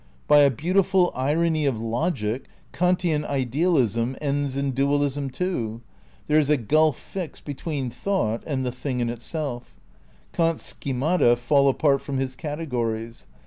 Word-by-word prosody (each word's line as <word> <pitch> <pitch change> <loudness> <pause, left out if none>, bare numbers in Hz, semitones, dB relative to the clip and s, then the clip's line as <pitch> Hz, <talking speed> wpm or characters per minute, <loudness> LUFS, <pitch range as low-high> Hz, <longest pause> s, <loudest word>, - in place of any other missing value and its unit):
By 150 - +7
a 140 -1 +7
beautiful 180 - +2
irony 155 +3 +1
of 125 -5 0
logic, 115 0 -2 0.3
Kantian 175 -1 +1
idealism 130 - +1
ends 140 -2 -1
in 140 0 0
dual 140 +2 +2
ism, 140 0 -2
too. 125 -8 -3 0.4
There 155 +1 +4
is 150 -2 +1
a 150 - +4
gulf 155 +5 +2
fixed 185 -5 -7
between 145 -3 -4
thought 120 - -1
and 135 -4 -1
the 125 - -1
Thing 130 0 -4
in 120 -1 0
Itself. 120 - -5 0.6
Kant's 165 -1 +1
schemata 135 -1 +1
fall 140 +3 +3
apart 140 0 +2
from 140 -2 -4
his 130 -1 -2
categories. 120 -7 -4
140 Hz, 145 wpm, -24 LUFS, 125-155 Hz, 0.6 s, By